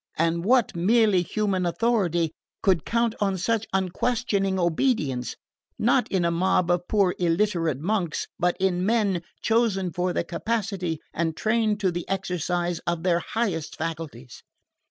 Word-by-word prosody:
And 165 +1 +1
what 245 0 +3
merely 205 +1 +4
human 195 0 -1
authority 175 -4 +1 0.3
could 185 -6 +2
count 235 -1 +1
on 195 -2 +1
such 225 +4 0
unquestioning 195 +1 0
obedience, 160 - 0 0.4
not 235 +1 +2
in 185 -3 +1
a 170 - +2
mob 180 0 +2
of 175 0 0
poor 195 -4 +2
illiterate 170 -4 +1
monks, 175 -1 -1
but 175 0 +1
in 185 -1 +1
men 205 -4 +1 0.2
chosen 220 -6 +1
for 180 +2 0
their - - -1
capacity 185 -2 -2 0.2
and 165 -1 -1
trained 215 -1 +1
to 190 -3 +2
the 175 0 -5
exercise 175 -2 -1
of 170 -1 -1
their 175 -2 +3
highest 170 -7 -2
faculties? 155 -7 -6
185 Hz, 140 wpm, -25 LUFS, 170-215 Hz, 0.4 s, merely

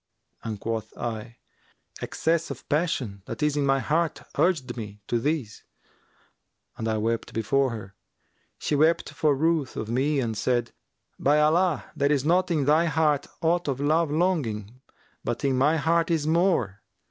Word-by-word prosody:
and 110 -3 -4
quoth 115 0 -4
I, 115 0 -5 0.6
'Excess 165 0 0
of 140 -2 -8
passion 145 - -1
that - - -4
is 150 -1 +2
in 145 -1 +1
my 135 0 +4
heart 160 +4 0
urged 145 -9 +1
me 105 -3 -7
to 120 - +1
this,' 140 -5 -2 1.1
and 115 - -4
I 110 -1 0
wept 115 +2 -2
before 135 +5 +1
her. 105 -4 -7 0.6
She - - -2
wept 160 +3 +2
for 150 -3 +2
ruth 155 -1 0
of 110 - -4
me 140 +4 +1
and 115 -4 -1
said, 120 +3 0 0.5
'By 145 +2 +3
Allah, 160 0 +2
there 140 -1 +2
is 145 -2 +1
not 180 +3 +3
in 155 -5 +1
thy 155 +4 +4
heart 150 -3 +1 0.2
aught 170 +1 +2
of 135 -2 -1
love 155 +3 +2
longing 130 - -1 0.4
but - - -2
in 135 -1 +2
my 145 +5 +3
heart 165 +2 +2
is 160 -3 +1
more! 155 - +1
145 Hz, 160 wpm, -26 LUFS, 120-160 Hz, 1.1 s, my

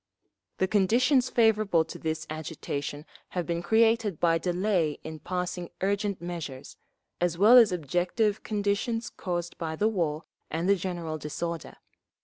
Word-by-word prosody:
The 190 - +1
conditions 245 +7 +3
favourable 215 -7 +3
to - - -9
this 160 0 -3
agitation 150 -1 -5 0.3
have 175 - 0
been 170 -1 -2
created 220 -1 +2
by 165 -1 +3
delay 180 -3 0
in 160 0 -7
passing 180 0 -3
urgent 200 0 0
measures, 170 -7 -6 0.5
as 175 -1 +1
well 215 +6 +7
as 230 -5 +8
objective 180 - 0
conditions 210 +3 -1
caused 175 -1 -4
by 160 -1 -3
the 210 +7 +2
war 165 -7 -1 0.3
and 165 +3 -2
the 200 - +5
general 175 -4 -4
disorder. 165 +2 -5
180 Hz, 135 wpm, -28 LUFS, 165-210 Hz, 0.5 s, as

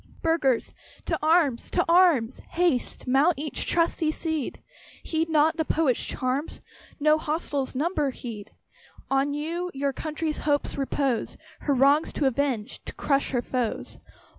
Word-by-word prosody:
Burghers! 300 -7 +1 0.3
to - - -1
arms! 310 -6 +2
to - - +1
arms! 335 -9 +4
Haste, 340 -8 0
mount 275 +7 +3
each 295 +1 -3
trusty 335 -2 +1
steed! 315 -3 -3 0.4
Heed 325 0 -1
not 315 0 +3
the 320 - +1
Prophet's 300 -6 +2
charms, 260 +4 -2 0.4
No 305 +1 +4
hostile 295 -3 -2
numbers 295 -2 0
heed! 220 -4 -7 0.6
On 275 +1 +2
you 335 +4 -3
your 275 0 -1
country's 310 +1 -3
hopes 290 -1 0
repose, 275 -3 -1 0.2
Her 285 - 0
wrongs 280 +4 +4
to 295 - 0
avenge 265 -3 -1
to - - -7
crush 280 -1 +1
her 245 -2 -1
foes. 245 -4 -3
290 Hz, 140 wpm, -26 LUFS, 265-320 Hz, 0.6 s, arms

